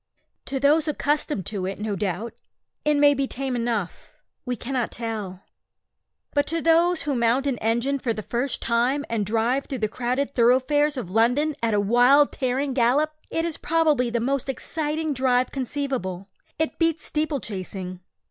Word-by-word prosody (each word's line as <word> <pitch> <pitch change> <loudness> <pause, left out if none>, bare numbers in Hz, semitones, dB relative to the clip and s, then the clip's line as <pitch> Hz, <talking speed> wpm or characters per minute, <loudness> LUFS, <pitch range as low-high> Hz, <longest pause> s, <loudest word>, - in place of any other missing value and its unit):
To 270 0 -3
those 300 +3 +3
accustomed 295 - 0
to 190 -1 -3
it, 195 - -4
no 210 -1 -2
doubt, 200 +3 -3 0.5
it 300 0 +2
may 290 0 +6
be 275 -1 -1
tame 265 0 -3
enough 230 -6 -3 0.3
we 250 - 0
cannot 245 0 -2
tell; 210 -5 -5 0.9
but 290 0 +2
to 330 +1 -1
those 335 +2 +3
who 285 -2 -1
mount 235 +3 +2
an 270 -4 -1
engine 235 +5 0
for 245 - -1
the 215 -1 -4
first 245 +5 -2
time 250 +5 +1
and 215 -4 0
drive 230 +5 +1
through 270 - -3
the 215 -2 0
crowded 255 +5 -2
thoroughfares 265 +5 +3
of 190 -8 -5
London 245 +8 +2
at 225 -2 +1
a - - +3
wild 245 +8 +5
tearing 265 +1 -1
gallop, 270 +5 +2 0.2
it 325 0 -1
is 335 -3 -3
probably 305 -6 +2
the 235 0 -1
most 270 +3 -1
exciting 310 +2 -2
drive 255 -1 +1
conceivable. 255 -9 -3 0.3
It 320 0 -2
beats 330 -1 +1
steeple 305 -2 -1
chasing. 185 -3 -6
255 Hz, 165 wpm, -24 LUFS, 230-290 Hz, 0.9 s, may